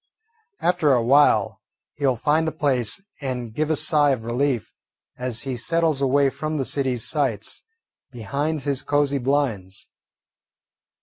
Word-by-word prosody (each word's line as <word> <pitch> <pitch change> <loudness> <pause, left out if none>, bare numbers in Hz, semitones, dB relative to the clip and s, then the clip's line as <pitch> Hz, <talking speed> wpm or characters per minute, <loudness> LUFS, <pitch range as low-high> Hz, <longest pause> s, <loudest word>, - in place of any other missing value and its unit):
After 170 -5 +3
a 120 -2 +2
while 140 +5 +3 0.3
he 145 -1 -1
will 130 - +2
find 155 +7 +1
a - - 0
place 140 - 0 0.2
and 125 -4 -4
give 155 +5 -1
a 160 - +2
sigh 150 -1 +3
of 130 -5 0
relief 125 0 -1 0.4
as 125 -2 -3
he 130 -1 -4
settles 160 +3 0
away 140 0 +3
from 155 +2 -3
the 135 - -1
city's 130 -5 0
sights 130 - -1 0.5
behind 140 +6 -3
his 140 -1 -1
cosey 145 -1 +1
blinds. 120 -8 -1
140 Hz, 140 wpm, -23 LUFS, 125-150 Hz, 0.5 s, After